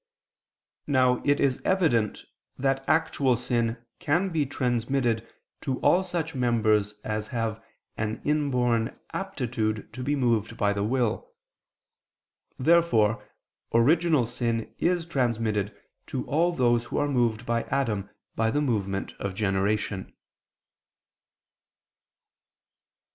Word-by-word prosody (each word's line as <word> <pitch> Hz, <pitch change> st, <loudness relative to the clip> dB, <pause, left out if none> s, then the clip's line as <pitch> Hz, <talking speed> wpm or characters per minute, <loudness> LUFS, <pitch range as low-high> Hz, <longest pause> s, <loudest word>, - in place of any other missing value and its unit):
Now 130 Hz, -3 st, +3 dB
it 145 Hz, 0 st, +3 dB
is 135 Hz, -2 st, +1 dB
evident 150 Hz, -, +1 dB, 0.3 s
that 135 Hz, 0 st, 0 dB
actual 155 Hz, -5 st, +2 dB
sin 120 Hz, -1 st, -1 dB
can 175 Hz, +3 st, +1 dB
be 155 Hz, -5 st, 0 dB
transmitted 120 Hz, -2 st, 0 dB, 0.3 s
to 135 Hz, -4 st, -2 dB
all 185 Hz, +2 st, +4 dB
such 170 Hz, -3 st, -3 dB
members 110 Hz, -5 st, +2 dB
as 105 Hz, 0 st, -3 dB
have 115 Hz, -2 st, -3 dB, 0.3 s
an 110 Hz, 0 st, -2 dB
inborn 125 Hz, -6 st, +1 dB
aptitude 120 Hz, -, -3 dB
to 130 Hz, -, -6 dB
be 145 Hz, +3 st, 0 dB
moved 115 Hz, -4 st, 0 dB
by 100 Hz, -1 st, +2 dB
the 100 Hz, 0 st, -1 dB
will. 120 Hz, 0 st, -1 dB, 1.3 s
Therefore 115 Hz, -9 st, +3 dB, 0.5 s
original 155 Hz, +3 st, +4 dB
sin 115 Hz, -1 st, -2 dB
is 175 Hz, -1 st, +1 dB
transmitted 115 Hz, -, -1 dB, 0.3 s
to -, -, -3 dB
all 170 Hz, +4 st, +2 dB
those 120 Hz, -6 st, +2 dB
who -, -, -4 dB
are 145 Hz, -, +2 dB
moved 120 Hz, -4 st, +1 dB
by 115 Hz, 0 st, +1 dB
Adam 110 Hz, -8 st, -1 dB, 0.3 s
by 115 Hz, 0 st, +1 dB
the 145 Hz, -, +1 dB
movement 100 Hz, -8 st, -1 dB
of 100 Hz, -2 st, -3 dB
generation. 100 Hz, 0 st, -1 dB
120 Hz, 110 wpm, -27 LUFS, 110-145 Hz, 1.3 s, all